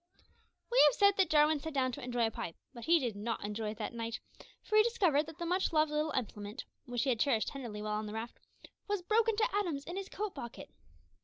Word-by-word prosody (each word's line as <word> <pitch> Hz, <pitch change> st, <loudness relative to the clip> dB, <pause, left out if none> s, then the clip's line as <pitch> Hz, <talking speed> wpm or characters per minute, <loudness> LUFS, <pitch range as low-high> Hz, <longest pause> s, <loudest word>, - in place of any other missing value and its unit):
We -, -, +6 dB
have -, -, +3 dB
said 400 Hz, -2 st, +5 dB
that 380 Hz, -4 st, +3 dB
Jarwin 300 Hz, 0 st, +4 dB
sat 315 Hz, 0 st, -6 dB
down 260 Hz, -1 st, +2 dB
to -, -, -7 dB
enjoy 245 Hz, -1 st, +1 dB
a 225 Hz, -, -1 dB
pipe, 165 Hz, -, -5 dB, 0.2 s
but 235 Hz, -3 st, -8 dB
he 340 Hz, +1 st, +6 dB
did 245 Hz, -8 st, -2 dB
not 215 Hz, +1 st, -3 dB
enjoy 210 Hz, +1 st, -3 dB
it 215 Hz, -, -6 dB
that 220 Hz, +1 st, -4 dB
night, 230 Hz, -1 st, -4 dB, 0.4 s
for 430 Hz, -, -2 dB
he 430 Hz, -, +9 dB
discovered 365 Hz, -10 st, +2 dB
that 320 Hz, -1 st, -10 dB
the 345 Hz, -, -4 dB
much 360 Hz, +3 st, +1 dB
loved 310 Hz, -1 st, +3 dB
little 300 Hz, +1 st, 0 dB
implement, 210 Hz, -3 st, -4 dB, 0.2 s
which 245 Hz, -1 st, -1 dB
he 275 Hz, -, 0 dB
had 235 Hz, -, -1 dB
cherished 235 Hz, -5 st, +2 dB
tenderly 230 Hz, -6 st, -6 dB
while 210 Hz, 0 st, -1 dB
on 215 Hz, -, -5 dB
the 210 Hz, -, -6 dB
raft, 225 Hz, +2 st, -6 dB, 0.5 s
was 410 Hz, -3 st, -1 dB
broken 445 Hz, +3 st, +3 dB
to 445 Hz, 0 st, +1 dB
atoms 340 Hz, -9 st, -1 dB
in 350 Hz, -, -5 dB
his 390 Hz, -1 st, -5 dB
coat 420 Hz, -1 st, -4 dB
pocket! 235 Hz, -5 st, -8 dB
280 Hz, 240 wpm, -33 LUFS, 230-360 Hz, 0.5 s, he